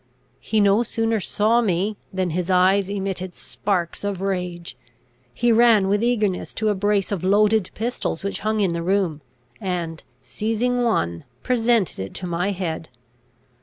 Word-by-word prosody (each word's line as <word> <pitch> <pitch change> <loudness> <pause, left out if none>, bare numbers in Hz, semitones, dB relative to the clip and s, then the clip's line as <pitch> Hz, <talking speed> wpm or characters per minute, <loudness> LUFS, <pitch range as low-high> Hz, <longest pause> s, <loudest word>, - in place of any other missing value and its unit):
He 220 - 0
no 200 +2 +4
sooner 225 -1 0
saw 220 +4 +2
me 200 0 0 0.2
than 185 -2 -1
his 180 +2 -2
eyes 190 +1 +3
emitted 190 -2 -3
sparks 180 -4 -2
of 200 -2 -2
rage. 180 -3 -3 0.6
He 240 - +1
ran 225 -4 +5
with 205 +1 +2
eagerness 215 -6 0
to 220 -1 0
a - - +3
brace 205 0 0
of 195 -4 -2
loaded 205 +1 +3
pistols 225 -7 -3
which 200 - -3
hung 215 0 0
in 185 -4 +1
the 170 - -2
room, 180 -4 0 0.4
and, 170 -4 -3 0.2
seizing 225 - -1
one, 85 - 0 0.2
presented 235 - +1
it 95 0 -6
to 185 - -4
my 175 +2 -1
head. 170 -5 -4
195 Hz, 155 wpm, -22 LUFS, 180-215 Hz, 0.6 s, ran